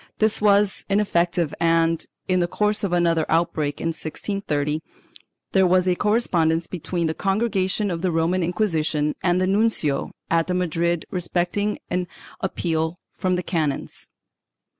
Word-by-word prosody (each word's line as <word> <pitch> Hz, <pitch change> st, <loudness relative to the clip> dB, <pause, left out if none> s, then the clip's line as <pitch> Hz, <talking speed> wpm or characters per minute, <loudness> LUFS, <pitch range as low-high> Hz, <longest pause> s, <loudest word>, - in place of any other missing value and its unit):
This 215 Hz, -1 st, +2 dB
was 205 Hz, -1 st, +3 dB
ineffective 175 Hz, -5 st, +1 dB
and, 165 Hz, 0 st, +2 dB, 0.2 s
in 185 Hz, -1 st, +2 dB
the 175 Hz, -, +2 dB
course 210 Hz, +3 st, 0 dB
of 195 Hz, -, 0 dB
another 170 Hz, -2 st, +2 dB
outbreak 160 Hz, -3 st, 0 dB
in 165 Hz, -, -1 dB
1630, 155 Hz, -2 st, -2 dB, 0.7 s
there 190 Hz, -1 st, +4 dB
was 185 Hz, +1 st, +3 dB
a 180 Hz, -, +4 dB
correspondence 175 Hz, -6 st, +1 dB
between 175 Hz, 0 st, -3 dB
the 160 Hz, -, 0 dB
Congregation 195 Hz, 0 st, 0 dB
of 165 Hz, -1 st, -3 dB
the 185 Hz, -1 st, +1 dB
Roman 165 Hz, +3 st, +1 dB
Inquisition 165 Hz, -4 st, 0 dB
and 175 Hz, 0 st, +2 dB
the 185 Hz, -, +2 dB
nuncio 195 Hz, -8 st, +1 dB, 0.2 s
at 165 Hz, +1 st, +2 dB
Madrid 170 Hz, -2 st, 0 dB
respecting 180 Hz, +3 st, -1 dB
an 180 Hz, 0 st, 0 dB, 0.3 s
appeal 165 Hz, -3 st, -1 dB, 0.2 s
from 185 Hz, -1 st, 0 dB
the 180 Hz, -, -2 dB
canons. 155 Hz, -6 st, -2 dB
175 Hz, 140 wpm, -23 LUFS, 165-190 Hz, 0.7 s, there